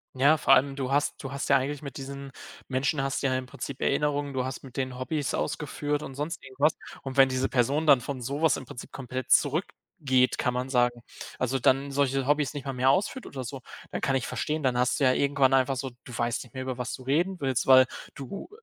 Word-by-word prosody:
Ja, 140 +4 +5
vor 145 - +4
allem 135 +1 +4
du 135 -1 -3
hast 145 +1 0
du 135 - -5
hast 140 0 -3
ja 140 - +6
eigentlich 135 +2 -3
mit 140 -2 -8
diesen 140 0 -7 0.4
Menschen 135 +2 0
hast 135 +1 -2
du - - +3
ja 130 -1 +1
im 130 - -4
Prinzip 130 +1 -7
Erinnerungen. 145 0 0
Du 130 -1 0
hast 130 +1 -5
mit 130 -3 -13
denen 130 -2 -3
Hobbys 145 +2 -2
ausgeführt 150 -1 -2
und 135 - -8
sonst 150 +4 -4
irgendwas. 135 +3 +1 0.3
Und 135 -1 -5
wenn 135 -1 +6
diese 130 0 0
Person 140 +5 +1
dann 140 -4 +7
von 130 +1 -5
sowas 145 +6 +1
im - - -8
Prinzip 120 - -9
komplett 130 -1 -6
zurückgeht, 145 -3 +1
kann 125 - 0
man 125 +1 -2
sagen 120 -2 +1 0.4
also 130 +1 0
dann 135 +3 +2
solche 135 -1 +1
Hobbys 145 -1 +2
nicht 145 -2 -6
mal 135 - -3
mehr 130 +1 +2
ausführt 200 - +1
oder 130 -2 -6
so, 130 +2 -7 0.3
dann - - -3
kann 135 - +1
ich 125 - -4
verstehen, 155 0 -2
dann 125 -2 +1
hast 125 0 +1
du 140 - +3
ja 130 - +5
irgendwann 140 -1 +2
einfach 135 0 +3
so 135 0 -4
du 120 -3 -8
weißt 120 0 -1
nicht 125 - -18
mehr, 130 - -4
über 130 -1 -4
was 125 -1 -4
du 130 - -7
reden 170 +8 0
willst, 135 -4 0
weil 130 -1 +8 0.3
du 140 - -7
135 Hz, 235 wpm, -27 LUFS, 130-145 Hz, 0.4 s, weil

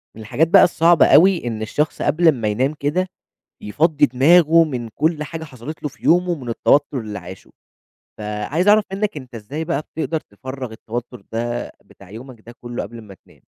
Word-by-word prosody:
من 110 - -10
الحاجات 150 +9 0
بقى 195 +3 +7
الصعبة 170 -1 +4
أوي، 175 -5 +5
إن 110 -2 -4
الشخص 150 +8 -2
قبل 160 +3 +3
ما 115 -7 -3
ينام 130 +7 0
كده 155 +5 -1 0.5
يفضِّي 150 +9 +2
دماغه 165 +6 +5
من 125 -7 -5
كل 150 +5 -1
حاجة 160 +1 -7
حصَلِت 140 +1 -10
له 150 - -2
في - - -23
يومه، 175 +1 +3
من 130 -6 -8
التوتُّر 135 +3 +1
اللي 105 -3 -6
عاشه. 90 0 -12 0.7
فعايِز 105 - -2
أعرَف 210 0 +5
مِنَّك، 200 -1 -2
أنتَ 130 -4 -10
إزاي 130 +9 -6
بقى 160 -3 -2
بتقدَر 160 0 -2
تفرّغ 130 +2 -8
التوتُّر 115 0 -7
ده، 120 +1 -3
بتاع 95 -2 -18
يومَك 120 +2 -11
ده 120 - -11
كلّه، 120 0 -5
قبل 115 -1 -9
ما 100 -2 -13
تنام؟ - - -23
140 Hz, 180 wpm, -20 LUFS, 115-160 Hz, 0.7 s, بقى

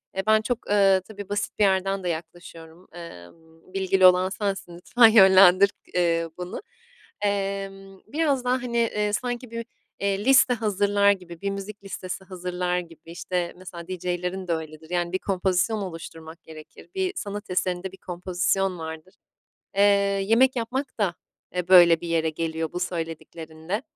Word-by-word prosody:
eee, 190 - -1
ben 215 0 +5
çok, 240 +2 -2
eee, 195 -2 +4
tabii, 205 -2 -9
basit 205 +1 -3
bir - - +4
yerden 195 0 +1
de 180 - -1
yaklaşıyorum, 165 +1 -8
emm, 165 - -13
bilgili 190 -1 +2
olan 185 +1 +6
sensin 195 -3 -4
lütfen 230 +6 +5
yönlendir 190 -2 +7
k - - -24
eee, 165 -2 +1
bunu. 180 - -6 0.6
Emm, 195 -1 -3
biraz 285 -2 0
daha, 250 +1 +2
hani, 235 -1 -3
eee, 210 -3 0
sanki 245 +2 -3
bü 230 0 -4 0.4
eee, 200 +1 -1
liste 260 -1 +5
hazırlar 205 -2 +2
gibi, 175 -4 -6
bir 200 - -1
müzik 200 +1 -7
listesi 190 -1 -6
hazırlar 180 -1 -3
gibi, 165 -1 -12
işte, 175 0 -3
mesela 175 -2 -10
DJ'lerin 180 +1 -4
de 170 - +1
öyledir. 160 0 -7
Yani, 175 -1 -1
bir 185 - 0
kompozisyon 190 +3 0
oluşturmak 165 -3 -8
gerekir. 155 - -13
Bir 375 -1 -1
sanat 205 -1 -6
eserinde 180 +1 -1
bir 190 - -14
kompozisyon 185 +1 -1
vardır. 160 +3 -8 0.6
Eee, 200 - +4 0.4
yemek 255 +5 +3
yapmak 250 +3 -3
da, 190 -5 +1 0.4
eee, 180 0 -3
böyle 175 -3 +7
bir 175 - -6
yere 160 -1 +1
geliyor, 160 0 -3
bu 180 - -4
söylediklerinle. 165 - -5
185 Hz, 155 wpm, -25 LUFS, 170-205 Hz, 0.6 s, yönlendir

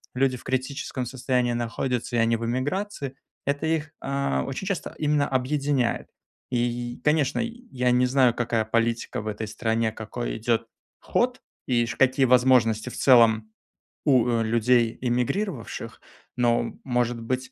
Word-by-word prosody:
люди 130 0 +2
в - - -15
критическом 130 0 -3
состоянии 125 -1 0
находятся 120 +1 -2
и - - +2
они 115 0 +3
в 115 - -4
эмиграции, 140 - -2 0.3
это 145 +2 -1
их, 160 -1 -1
а, 140 0 -1
очень 135 +8 -5
часто 195 -3 -3
именно 150 -1 +1
объединяет. 135 -1 0 0.4
И, 125 - 0
й 120 0 -2
конечно, 150 -2 +2
я 235 - -2
не 125 +1 +4
знаю, 125 -2 +4
какая 115 -2 0
политика 115 0 0
в 110 - -8
этой 110 0 -4
стране, 110 +1 0
какой 110 +2 -5
идет 115 0 0 0.3
ход 250 +1 0 0.3
и, 120 -2 +2
ш 115 - -5
какие 135 0 +4
возможности 125 -3 +4
в - - -9
целом 110 -4 +5 0.5
у 125 -4 +3
людей 115 +1 +2
эмигрировавших. 125 - -2 0.4
Но, 120 -1 +1
может 120 -2 0
быть, 130 +2 -3
125 Hz, 145 wpm, -25 LUFS, 115-135 Hz, 0.5 s, целом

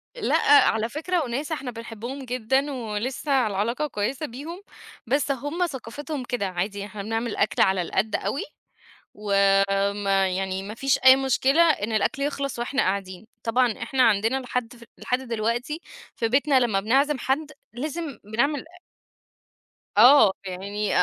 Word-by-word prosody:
لأ - - 0 0.3
على 225 +1 -1
فكرة 325 +5 -1
وناس 275 +5 -4
إحنا 275 -5 -3
بنحبهم 235 +3 -7
جدًا 255 +3 0
ولسه 250 +2 -1
العلاقة 225 +9 -1
كويسة 255 +5 -3
بيهم، 300 +8 -8 0.5
بس 280 +3 +1
هُم 290 +7 -1
ثقافتهم 280 +2 -6
كده، 245 -4 -2
عادي 195 +3 -3
إحنا 205 0 -8
بنعمل 225 +1 -2
أكل 200 - +1
على 190 -1 +3
القد 195 +5 -1
أوي، 275 - -2 1.3
وما 195 0 +1
يعني 190 +1 -2
ما 210 +2 -7
فيش 270 +2 +1
أي 260 0 +10
مشكلة 270 +3 +2
إن 295 -10 +2
الأكل 220 +7 0
يخلص 280 -3 -3
وإحنا 255 +3 0
قاعدين. 190 +1 -3 0.2
طبعًا 245 +1 +2
إحنا 265 -1 +1
عندنا 225 +3 +3
لحد 250 -2 -3
ف 235 - -15
لحد 250 - -1
دلوقتي 240 +5 -2 0.3
في 230 - 0
بيتنا 275 +2 +3
لما 230 -6 +1
بنعزم 270 +8 +2
حد 290 +5 -1 0.2
لازم 295 +1 -5
بنعمل 255 +7 -1 1.3
آه 245 -1 +8
يعني 200 +3 -3
240 Hz, 140 wpm, -24 LUFS, 210-275 Hz, 1.3 s, أي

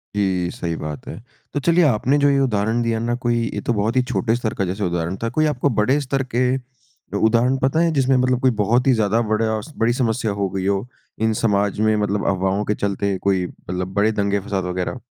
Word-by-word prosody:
जी 95 -3 0
सही 85 -1 -4
बात 75 -4 -6
है। - - -6 0.4
तो 145 - 0
चलिए 170 +4 +3
आपने 130 +2 +2
जो 145 0 +4
ये 140 - +3
उदाहरण 115 -2 +1
दिया 115 -1 0
ना 120 +1 -1
कोई 120 0 +2 0.2
ये - - -3
तो 120 - +2
बहुत 110 +3 0
ही 130 - +4
छोटे 115 -2 0
स्तर 120 -3 -2
का 100 - -1
जैसे 95 +3 -3
उदाहरण 85 0 -2
था। 115 - 0
कोई 155 +4 +1
आपको 145 -2 +1
बड़े 130 +7 +3
स्तर 135 0 -1
के, 125 +1 +2 0.6
उदाहरण 120 +4 +3
पता 135 +5 +2
है 170 0 +3
जिसमें 135 -1 +2
मतलब 125 -1 +2
कोई 130 - +4
बहुत 120 +6 +2
ही 130 - +6
ज़्यादा 110 0 +2
बड़ा 110 0 0 0.2
बड़ी 115 +1 +2
समस्या 115 -3 0
हो 100 -1 -1
गई 95 0 -3
हो 100 +4 0 0.3
इन 110 0 +2
समाज 100 -2 +1
में 110 0 +3
मतलब 105 -1 -1
अफवाहों 95 +2 0
के 105 - 0
चलते 100 -1 -1
कोई 95 -2 +1
मतलब 90 +2 -6
बड़े 105 +2 +2
दंगे 100 -1 0
फ़साद 100 -1 -3
वगैरह? 90 +7 -3
110 Hz, 220 wpm, -21 LUFS, 100-125 Hz, 0.6 s, ही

